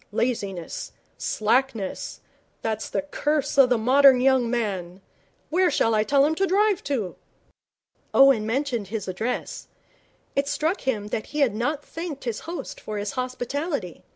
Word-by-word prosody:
'Laziness 200 Hz, -7 st, -3 dB, 0.3 s
slackness 225 Hz, -2 st, -1 dB, 0.4 s
that's 220 Hz, -1 st, -2 dB
the -, -, -1 dB
curse 290 Hz, 0 st, -1 dB
of 260 Hz, -2 st, +7 dB
the 245 Hz, -, +3 dB
modern 260 Hz, +3 st, +6 dB
young 260 Hz, -2 st, +3 dB
man. 195 Hz, -7 st, -2 dB, 0.5 s
Where 360 Hz, +2 st, +3 dB
shall 225 Hz, -, +2 dB
I 215 Hz, -1 st, +3 dB
tell 275 Hz, +5 st, +4 dB
him 310 Hz, -, +2 dB
to 390 Hz, -, +4 dB
drive 405 Hz, 0 st, +2 dB
to?' 230 Hz, -10 st, -2 dB, 0.9 s
Owen 270 Hz, -6 st, +5 dB
mentioned 240 Hz, -3 st, -1 dB
his 210 Hz, -1 st, -4 dB
address. 220 Hz, +7 st, -3 dB, 0.7 s
It 275 Hz, 0 st, +1 dB
struck 320 Hz, +6 st, 0 dB
him 210 Hz, -5 st, -1 dB
that 215 Hz, -, -3 dB
he 295 Hz, -, -3 dB
had 255 Hz, -7 st, +3 dB
not 285 Hz, +7 st, -2 dB
thanked 330 Hz, -4 st, -6 dB
his 235 Hz, -3 st, -3 dB
host 345 Hz, -, -6 dB
for 215 Hz, -, -5 dB
his 205 Hz, 0 st, -3 dB
hospitality. 255 Hz, -, -3 dB
250 Hz, 150 wpm, -25 LUFS, 215-285 Hz, 0.9 s, of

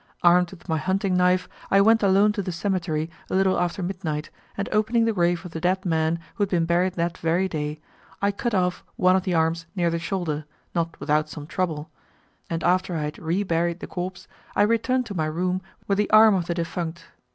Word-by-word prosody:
Armed 175 Hz, 0 st, +5 dB
with 190 Hz, 0 st, -14 dB
my 160 Hz, -2 st, 0 dB
hunting 190 Hz, +2 st, 0 dB
knife, 180 Hz, 0 st, +3 dB, 0.2 s
I 195 Hz, -, +5 dB
went 225 Hz, +3 st, +5 dB
alone 200 Hz, +1 st, +4 dB
to 210 Hz, -1 st, -2 dB
the 185 Hz, -, -4 dB
cemetery 170 Hz, -4 st, -1 dB, 0.2 s
a -, -, -1 dB
little 190 Hz, 0 st, +3 dB
after 175 Hz, +1 st, -1 dB
midnight, 170 Hz, -5 st, -3 dB, 0.3 s
and 200 Hz, -, -2 dB
opening 220 Hz, +2 st, +2 dB
the 225 Hz, -, +1 dB
grave 175 Hz, -1 st, +1 dB
of 180 Hz, -, -7 dB
the 160 Hz, -, -5 dB
dead 185 Hz, +2 st, +1 dB
man 160 Hz, -1 st, +1 dB, 0.2 s
who -, -, -7 dB
had 200 Hz, -, +2 dB
been 170 Hz, -3 st, +1 dB
buried 175 Hz, +2 st, +1 dB
that 170 Hz, 0 st, -2 dB
very 170 Hz, +3 st, +1 dB
day, 150 Hz, -3 st, -4 dB, 0.4 s
I 200 Hz, 0 st, +2 dB
cut 225 Hz, +3 st, -2 dB
off 180 Hz, -1 st, 0 dB
one 185 Hz, 0 st, +4 dB
of 190 Hz, -, 0 dB
the 180 Hz, -3 st, 0 dB
arms 165 Hz, +1 st, +1 dB
near 175 Hz, -3 st, +1 dB
the 170 Hz, -, -1 dB
shoulder, 165 Hz, -4 st, -2 dB, 0.3 s
not 170 Hz, -1 st, -2 dB
without 150 Hz, 0 st, +1 dB
some 150 Hz, -1 st, -7 dB
trouble, 160 Hz, -2 st, -3 dB, 0.6 s
and 165 Hz, 0 st, -2 dB
after 180 Hz, 0 st, +2 dB
I 155 Hz, -, -1 dB
had 150 Hz, 0 st, -5 dB
re 170 Hz, +5 st, 0 dB
buried 170 Hz, -1 st, 0 dB
the -, -, -6 dB
corpse, 180 Hz, 0 st, -6 dB, 0.3 s
I 205 Hz, -, +4 dB
returned 230 Hz, +4 st, +1 dB
to 210 Hz, -, -6 dB
my 160 Hz, -4 st, -1 dB
room 180 Hz, +4 st, -1 dB, 0.3 s
with 200 Hz, 0 st, +1 dB
the 210 Hz, -, +1 dB
arm 215 Hz, 0 st, +7 dB
of 180 Hz, -3 st, 0 dB
the 170 Hz, -, -1 dB
defunct. 170 Hz, 0 st, -4 dB
180 Hz, 220 wpm, -24 LUFS, 165-195 Hz, 0.6 s, arm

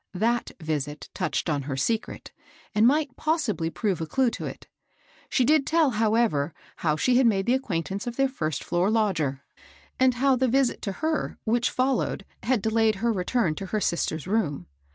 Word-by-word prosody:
ThcA 235 Hz, +2 st, 0 dB
visit 150 Hz, -2 st, -4 dB
touched -, -, -2 dB
on 150 Hz, -3 st, 0 dB
her 135 Hz, -, -2 dB
secret, 220 Hz, +11 st, -2 dB, 0.4 s
and 215 Hz, +2 st, +5 dB
might 290 Hz, -1 st, +1 dB
possibly 275 Hz, -, 0 dB
prove 190 Hz, -1 st, -1 dB
a 160 Hz, -, -3 dB
clue 255 Hz, +8 st, +2 dB
to -, -, -5 dB
it. -, -, -9 dB, 0.6 s
She 255 Hz, -, +2 dB
did 300 Hz, 0 st, +3 dB
tell, 320 Hz, -4 st, +3 dB
however, 215 Hz, -9 st, +1 dB, 0.2 s
how 155 Hz, -2 st, +1 dB
she 245 Hz, +10 st, +2 dB
had 260 Hz, -2 st, +5 dB
made 195 Hz, -2 st, +1 dB
acquaintance 200 Hz, -5 st, -1 dB
with 240 Hz, -, -3 dB
their 270 Hz, +1 st, +3 dB
first 155 Hz, -, -3 dB
floor 175 Hz, +3 st, +1 dB
lodger, 170 Hz, -12 st, 0 dB, 0.6 s
and 255 Hz, -1 st, +4 dB
how 265 Hz, +1 st, +3 dB
the 260 Hz, +1 st, +1 dB
visit 260 Hz, 0 st, +1 dB
to 200 Hz, -, -3 dB
her 315 Hz, -2 st, -1 dB
which 235 Hz, +2 st, +1 dB
fol 255 Hz, 0 st, +1 dB
lowed 195 Hz, -, -3 dB, 0.2 s
had 240 Hz, -4 st, 0 dB
delayed 220 Hz, -1 st, +2 dB
her 230 Hz, +4 st, 0 dB
return 185 Hz, -2 st, 0 dB
to 195 Hz, +4 st, -6 dB
her 215 Hz, -, -1 dB
sister's 165 Hz, -4 st, -1 dB
room. 180 Hz, -, -1 dB
220 Hz, 180 wpm, -26 LUFS, 170-255 Hz, 0.6 s, and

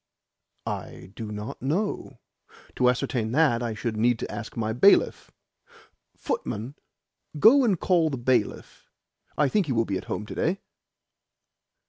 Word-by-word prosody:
"I 95 Hz, -, -6 dB
do 110 Hz, -2 st, -6 dB
not 105 Hz, +1 st, -6 dB
know. 170 Hz, -, -2 dB, 0.6 s
To 125 Hz, -, +4 dB
ascertain 120 Hz, -2 st, -1 dB
that 140 Hz, -6 st, +3 dB
I 115 Hz, -2 st, -3 dB
should 110 Hz, 0 st, -3 dB
need 120 Hz, +2 st, +3 dB
to -, -, -5 dB
ask 105 Hz, +2 st, -7 dB
my 110 Hz, -1 st, -1 dB
bailiff. 135 Hz, -, +4 dB, 0.9 s
Footman, 115 Hz, +6 st, -4 dB, 0.6 s
go 245 Hz, -, +7 dB
and 200 Hz, -8 st, +2 dB
call 170 Hz, -4 st, +2 dB
the 135 Hz, -, -3 dB
bailiff. 120 Hz, -3 st, -1 dB, 0.5 s
I 150 Hz, -, +3 dB
think 195 Hz, +4 st, +1 dB
he 135 Hz, -, 0 dB
will 115 Hz, -1 st, +1 dB
be 95 Hz, -2 st, -2 dB
at -, -, -11 dB
home 105 Hz, -, -4 dB
to -, -, -8 dB
day." 185 Hz, +5 st, -1 dB
125 Hz, 145 wpm, -26 LUFS, 110-160 Hz, 0.9 s, go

